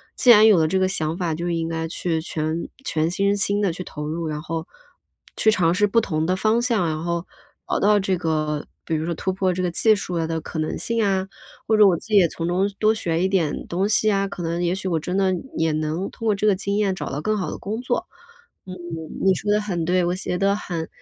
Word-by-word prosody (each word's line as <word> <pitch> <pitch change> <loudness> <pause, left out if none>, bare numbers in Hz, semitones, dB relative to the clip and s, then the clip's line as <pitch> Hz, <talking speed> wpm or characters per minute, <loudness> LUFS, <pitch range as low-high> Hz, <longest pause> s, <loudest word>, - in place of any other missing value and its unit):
既 250 - +2
然 215 -2 +9
有 215 -4 +7
了 160 - +3
这 190 - 0
个 190 0 +2
想 160 -4 -2
法， 175 -4 -1
就 170 +3 -3
应 165 -1 -1
该 165 0 -3
去 165 -1 -2
全 160 0 -3 0.2
全 160 0 0
身 200 +3 +1
心 200 0 +1
地 195 -5 +1
去 180 - -6
投 150 -3 -6
入， 165 +1 -3
然 150 -1 -3
后， 160 +1 -4 0.7
去 220 - +3
尝 170 -5 +3
试 205 +3 +3
不 230 +3 +3
同 160 -8 -1
的 185 +2 +1
方 215 +4 +2
向， 235 -7 +1
然 155 0 -3
后 170 0 -2 0.4
熬 - - -1
到 210 0 +4
这 190 -1 0
个 155 -3 -1 0.2
比 165 - -3
如 155 +1 -2
说 170 0 -2
突 190 - -2
破 185 0 +1
这 185 +1 -2
个 180 - 0
技 215 +5 +4
术， 180 -3 -5
呃， 165 -1 0
的 165 0 -2
可 160 - -6
能 155 - -2
性 230 -1 -1
啊， 190 -2 +1 0.4
或 220 - +3
者 210 -1 +8
我 180 -3 +3
自 - - -13
己 210 - +4
也 180 -3 +6
从 165 +1 -4
中 185 +3 +1
多 215 0 +3
学 170 -6 -1
一 - - +3
点 180 -6 0
东 190 +4 0
西 215 0 +3
啊， 195 0 +1
可 185 -2 -6
能 170 +1 -2
也 175 +1 +1
许 190 - -5
我 165 -3 +1
真 180 +4 -3
的 190 -1 +2 0.2
也 160 0 +2
能 155 +4 -2
通 225 - -8
过 210 - +3
这 200 - -2
个 205 -2 +4
经 200 +1 -2
验 205 -2 +1
找 - - -5
到 140 - -3
更 215 +5 0
好 190 - -2
的 - - -5
工 215 +4 -4
作。 255 +8 -2 0.6
嗯， 185 - -6 0.5
你 190 - +6
说 205 +3 -2
得 210 - +3
很 180 -6 -2
对， 180 +1 +2
我 175 - 0
觉 180 -1 -3
得 200 +2 +2
很 170 -5 -4
180 Hz, 280 characters per minute, -23 LUFS, 165-200 Hz, 0.7 s, 然